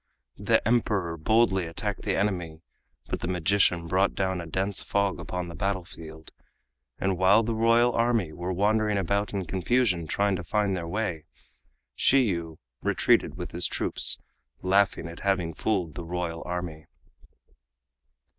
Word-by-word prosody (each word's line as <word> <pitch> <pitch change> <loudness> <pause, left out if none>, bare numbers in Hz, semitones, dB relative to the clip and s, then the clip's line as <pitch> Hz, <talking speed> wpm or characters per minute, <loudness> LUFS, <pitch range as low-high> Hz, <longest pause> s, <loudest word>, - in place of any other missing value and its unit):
The - - +2
Emperor 105 -8 +1
boldly 95 +1 +2
attacked 100 +5 -4
the - - -1
enemy, 85 -5 -2 0.5
but - - -2
the - - -4
magician 90 -1 +2
brought 95 +3 +1
down 95 -2 -1
a 85 - -8
dense 95 +4 -1
fog 100 -1 0
upon 90 -1 -4
the 85 - -8
battlefield, 85 -5 -5 0.7
and 95 -2 -1
while 100 +4 +5
the 115 +1 -1
royal 115 +2 +3
army 115 -8 +1
were 90 +2 -4
wandering 105 +2 +1
about 100 +1 0
in 95 -2 -3
confusion, 95 -1 +1
trying 100 +4 +1
to 90 - -6
find 100 +1 0
their 85 -2 -4
way, 90 -4 -3 0.7
Shiyu 85 - +2 0.2
retreated - - +2
with - - -6
his 85 -1 +2
troops, - - +1 0.5
laughing 95 -2 +2
at 85 0 -9
having 95 -4 0
fooled 90 -4 -1
the 85 - -6
royal 85 -1 -4
army. 85 -3 -5
95 Hz, 145 wpm, -27 LUFS, 85-105 Hz, 0.7 s, while